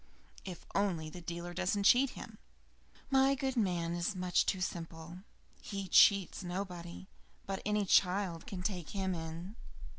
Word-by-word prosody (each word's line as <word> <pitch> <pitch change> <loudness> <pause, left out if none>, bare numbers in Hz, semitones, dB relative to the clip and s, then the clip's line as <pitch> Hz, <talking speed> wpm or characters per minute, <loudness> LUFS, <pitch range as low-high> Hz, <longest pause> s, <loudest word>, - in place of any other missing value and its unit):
"If 180 -3 -8
only 175 -6 0
the 180 - -9
dealer 170 +1 -5
does 185 +2 0
not 200 -1 -1
cheat 255 +5 +6
him. - - -9 0.7
My 270 +1 +4
good 265 0 -2
man 175 -7 0
is 175 +4 -1
much 180 -1 +1
too 190 - +1
simple; 170 -1 -5 0.4
he 200 -5 -5
cheats 195 +1 +5
nobody, 180 -1 -6 0.4
but 195 -1 -4
any 210 -1 +1
child 180 -2 +2
can 185 -2 -5
take 180 -5 -3
him 190 -2 -1
in. 165 +4 -6
185 Hz, 150 wpm, -33 LUFS, 170-200 Hz, 0.7 s, cheat